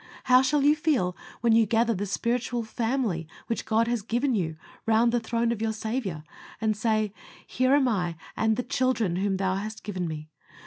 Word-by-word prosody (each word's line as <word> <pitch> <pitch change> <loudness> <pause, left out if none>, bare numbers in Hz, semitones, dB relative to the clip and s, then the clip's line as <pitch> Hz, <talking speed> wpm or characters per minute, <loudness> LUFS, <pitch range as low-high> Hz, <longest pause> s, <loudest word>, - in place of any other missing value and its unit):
How 255 0 +6
shall 280 +2 +2
you 295 +1 +5
feel 275 - +1 0.3
when 235 -2 +4
you 225 -1 +5
gather 230 +2 +2
the 205 0 -3
spiritual 235 +3 -1
family 225 - -1 0.2
which 230 - -3
God 225 +1 +2
has 240 -2 0
given 245 +5 0
you 165 -7 -1 0.3
round 225 +1 +4
the 240 - +2
throne 230 +1 0
of 225 -2 -3
your 220 -1 0
Saviour, 220 -7 -3 0.4
and 220 -1 +1
say, 215 -1 0 0.3
"Here 255 +2 +2
am 280 -2 +3
I 180 -7 0 0.2
and 220 0 +2
the 250 - -1
children 240 -8 0
whom 195 0 0
Thou 190 -1 0
hast 215 +2 -6
given 185 -4 -3
me"? 155 -1 -6
225 Hz, 190 wpm, -27 LUFS, 200-245 Hz, 0.4 s, How